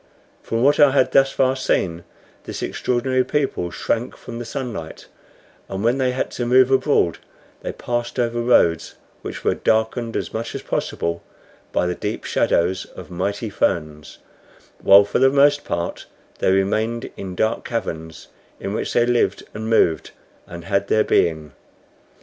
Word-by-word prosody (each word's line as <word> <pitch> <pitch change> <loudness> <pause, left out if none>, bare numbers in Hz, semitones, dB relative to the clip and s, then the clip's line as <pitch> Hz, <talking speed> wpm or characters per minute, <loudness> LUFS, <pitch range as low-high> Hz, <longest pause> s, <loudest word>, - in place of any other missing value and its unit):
From 115 +1 -2
what 145 +2 +4
I 145 - +8
had 135 -1 +2
thus 135 0 +4
far 130 0 +2
seen, 85 -9 -1 0.4
this - - -5
extraordinary 130 +1 0
people 135 -12 -1
shrank 115 +7 -2
from 115 0 -8
the 120 - -5
sunlight; 120 - -6 0.6
and 95 +1 -4
when 120 +4 +2
they 130 -1 +2
had 125 +1 -2
to 120 - -3
move 130 +1 +5
abroad 130 - +2 0.4
they - - -4
passed 120 +1 -3
over 120 -1 0
roads 85 -9 +2 0.3
which - - -7
were - - +2
darkened 115 +1 0
as - - -4
much 115 +1 -4
as - - -5
possible 85 0 -2 0.5
by - - +1
the 90 - 0
deep - - -4
shadows 90 +2 +1
of - - -12
mighty 100 +4 -3
ferns, 75 -5 -2 0.6
while 100 +1 +8
for 100 - -1
the 135 +1 +6
most 145 +1 +4
part 85 0 -4 0.3
they - - +2
remained 110 +5 0
in 95 -2 -7
dark 110 +5 0
caverns, 80 -9 -5 0.3
in 100 - -4
which - - -3
they 120 - +4
lived 120 0 +1
and 110 +1 -5
moved 85 -8 +2 0.4
and 85 -1 -9
had 100 0 0
their 110 +1 +3
being. 80 -3 +1
115 Hz, 160 wpm, -21 LUFS, 90-125 Hz, 0.6 s, I